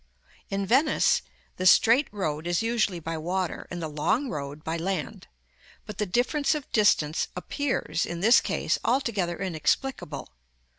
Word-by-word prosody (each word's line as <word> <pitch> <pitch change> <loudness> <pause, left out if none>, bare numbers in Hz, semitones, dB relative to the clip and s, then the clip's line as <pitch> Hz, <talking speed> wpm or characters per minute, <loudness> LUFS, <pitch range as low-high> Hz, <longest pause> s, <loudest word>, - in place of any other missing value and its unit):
In 195 0 -1
Venice, 270 +9 +3 0.4
the 185 - +1
straight 240 +9 +6
road 160 -6 -3
is 175 +5 0
usually 220 -6 0
by 165 0 -4
water, 180 +2 -3
and 175 - -5
the - - -2
long 180 - 0
road 145 -1 -6
by 160 - -2
land; 170 -2 -4 0.6
but 210 - -9
the 210 - 0
difference 275 - +1
of 295 -3 -6
distance 160 -8 +2
appears, 180 - -2
in 170 - -5
this 225 +7 +6
case, - - -1
altogether 205 -9 0
inexplicable. 180 - -2
190 Hz, 145 wpm, -26 LUFS, 160-235 Hz, 0.6 s, straight